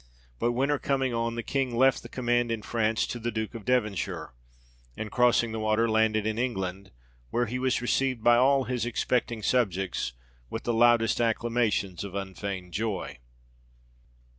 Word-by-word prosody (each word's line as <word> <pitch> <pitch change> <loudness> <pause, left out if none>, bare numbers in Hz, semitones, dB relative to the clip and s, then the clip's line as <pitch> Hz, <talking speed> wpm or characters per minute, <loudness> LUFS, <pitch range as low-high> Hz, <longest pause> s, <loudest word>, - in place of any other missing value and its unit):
But 120 - +1
winter 135 +3 +1
coming 135 -2 0
on, 115 0 -1
the 120 - -3
King 130 -2 -1
left 130 +1 +4
the 120 - -11
command 120 -1 0
in 110 -2 -3
France 110 -1 0
to 120 - -5
the 120 +1 -2
Duke 110 0 -3
of 115 -3 -8
Devon 125 -5 +2
shire; 85 -8 -5 0.6
and 110 - -5
crossing 120 -2 +3
the 110 - -3
water, 110 +1 +2
landed 110 -1 +2
in 110 +1 -1
England; 95 -6 -3 0.4
where 120 - +1
he 125 +3 -3
was 130 -1 0
received 130 -2 0
by 120 0 +6
all 135 +2 +4
his 125 -2 -2
expecting 120 -1 -1
subjects 95 - 0 0.4
with 115 - -5
the 120 - 0
loudest 120 0 +4
acclamations 115 -5 0
of 100 -1 -7
unfeigned 95 -2 -5
joy. 105 - -3
115 Hz, 165 wpm, -28 LUFS, 110-120 Hz, 0.6 s, by